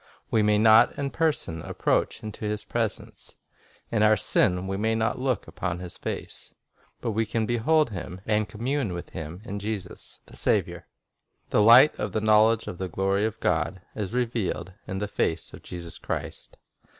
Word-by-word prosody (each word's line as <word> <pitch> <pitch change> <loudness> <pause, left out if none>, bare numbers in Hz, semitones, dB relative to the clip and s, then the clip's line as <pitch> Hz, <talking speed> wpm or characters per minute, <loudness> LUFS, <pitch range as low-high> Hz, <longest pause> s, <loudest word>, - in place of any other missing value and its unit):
We 110 - +3
may 105 0 +3
not 110 +1 +6
in 140 -1 -2
person 145 - 0
approach - - -1
into 110 0 -7
His 105 0 -2
presence; - - -3 0.6
in 110 - +1
our 110 0 +5
sin 90 -2 +2
we 95 0 -2
may 110 +3 +1
not 110 +2 0
look 130 -5 -1
upon 90 -2 -3
His 90 -1 -8
face; - - -6 0.5
but 115 - -1
we 110 +1 +1
can 110 +1 -1
behold 120 +5 +2
Him 90 -1 -6
and 105 -1 +1
com 110 +1 -8
mune 130 -6 0
with 85 - -7
Him 80 +4 -7
in 100 -3 -4
Jesus, 105 -1 -6
the - - -14
Saviour. - - 0 0.6
"The - - +4
light 120 +7 +8
of 100 -3 -3
the - - +1
knowledge 110 +1 +4
of 90 - -7
the 95 -1 -3
glory 95 +4 +1
of 110 0 -3
God" 95 - 0
is 105 -3 -4
revealed 115 -6 -2
"in 95 - -4
the 105 +1 -2
face 80 -4 -1
of - - -10
Jesus 85 -2 -8
Christ." - - -5
105 Hz, 180 wpm, -26 LUFS, 95-115 Hz, 0.6 s, light